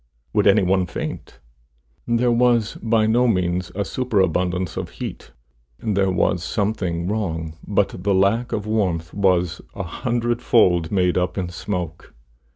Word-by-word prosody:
Would - - +3
any - - +5
one 95 0 +2
faint? - - -6 0.7
There 120 +1 +2
was 120 -2 +3
by 110 -1 +2
no 120 +3 +3
means 90 -4 0
a 100 0 -1
superabundance 95 -7 0
of - - -4
heat; - - -7 0.5
there 100 -3 0
was 90 -1 +1
something 95 -5 -1
wrong, 80 -7 -2
but 100 -1 +2
the 100 +1 +1
lack 100 +6 +2
of 105 -1 -2
warmth 90 -6 -1
was 90 -3 +1
a 100 - -3
hundred 120 +6 -2
fold 90 -8 +3
made 90 -2 +2
up 90 +1 -2
in 90 -2 -2
smoke. 90 -4 -5
95 Hz, 145 wpm, -22 LUFS, 90-110 Hz, 0.7 s, any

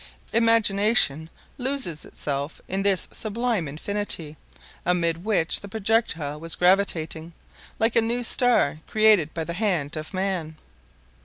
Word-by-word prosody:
Imagination 210 - +2 0.3
loses 255 - 0
itself 140 +1 -5
in 190 +1 -2
this 195 -3 +1
sublime 220 -5 -2
Infinity, 160 0 -2 0.5
amid 170 -1 0
which 195 -6 +1
the 200 - -10
projectile 195 -9 -1
was 165 +1 -4
gravitating, 170 -3 +1 0.4
like 225 +1 +1
a 230 - +5
new 235 +2 -1
star 235 - +3
created 215 -8 +4
by 165 - -2
the 170 - -5
hand 175 -7 -1
of 155 0 -6
man. 185 -5 -2
190 Hz, 125 wpm, -24 LUFS, 160-220 Hz, 0.5 s, a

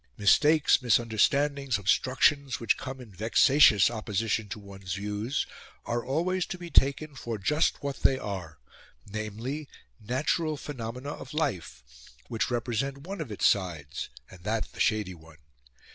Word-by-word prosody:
Mistakes, 145 - +4
misunderstandings, 125 +4 +2
obstructions, 130 +7 +2
which 115 - +2
come 130 0 -7
in 120 -4 -11
vexatious 115 +3 +5
opposition 110 -1 -2
to 110 - -5
one's 95 -3 -7
views, 105 +6 -2 0.4
are 120 0 -1
always 175 +7 0
to - - -5
be 175 -1 -9
taken 140 +3 +3
for 120 -4 -5
just 150 - +1
what 140 -1 -3
they 135 - +3
are 95 -9 -6 0.5
namely, 110 +8 -5 0.3
natural 150 +7 -1
phenomena 125 -1 -6
of 150 - -9
life, 90 - -2 0.5
which 115 -3 -1
represent 120 +3 -1
one 195 0 -5
of 135 -8 -6
its 105 - -1
sides, 85 -8 0 0.2
and 90 -2 -15
that 110 +2 -2
the - - -14
shady 105 -4 +1
one. 80 -2 -16
120 Hz, 140 wpm, -28 LUFS, 105-140 Hz, 0.5 s, vexatious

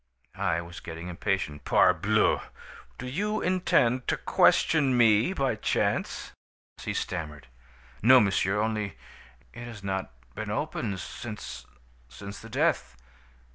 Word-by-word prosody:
"I 90 -4 0
was 85 0 -9
getting 85 +1 -7
impatient. 85 -4 -2
"'Parbleu! - - +3 0.6
Do 125 - -7
you 210 +11 -1
intend 130 -9 +2
to - - +1
question 140 -6 +3
me, 115 - +5
by 135 -9 0
chance?' 110 - -1 0.5
"He - - -3
stammered: 75 -5 -4 0.6
"'No 130 +4 +8
monsieur 100 -1 +1
only 105 -2 -2 0.6
it 120 - -8
has 115 -4 -9
not 95 -5 -3 0.2
been - - -5
opened 100 -4 -2
since 105 +6 -7 0.4
since 100 +11 -9
the - - -11
death. 60 - 0
105 Hz, 120 wpm, -28 LUFS, 90-125 Hz, 0.6 s, No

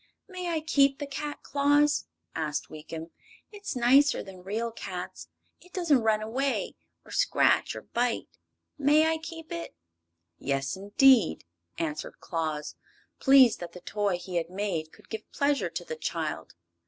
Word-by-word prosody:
"May 365 -3 -5
I 325 -2 0
keep 280 -3 +3
the 290 - -4
cat, 290 +1 -5
Claus?" 290 +1 +3 0.3
asked 150 -2 -2
Weekum. 160 +2 -8 0.4
"It's 405 -7 -6
nicer 270 +4 +4
than 190 -1 -11
real 220 +5 -2
cats. 185 -4 -7 0.3
It 360 - -20
doesn't 335 -7 +3
run 215 -1 +2
away, 265 +5 -1 0.3
or - - -14
scratch - - +3
or - - -7
bite. 240 0 -1 0.5
May 295 +2 +5
I 320 0 +1
keep 325 0 -9
it?" 170 0 -5 0.6
"Yes, 135 0 -1
indeed," 205 +2 +4 0.3
answered 155 -2 -3
Claus, 155 -3 -3 0.5
pleased 265 -4 +6
that 170 -1 -7
the 180 - -9
toy 205 -2 -1
he 180 0 -4
had 165 0 -1
made 185 -5 -3
could - - -19
give 220 -1 -7
pleasure 285 0 +1
to - - -5
the 475 - -5
child. 475 - -4
235 Hz, 150 wpm, -28 LUFS, 180-290 Hz, 0.6 s, pleased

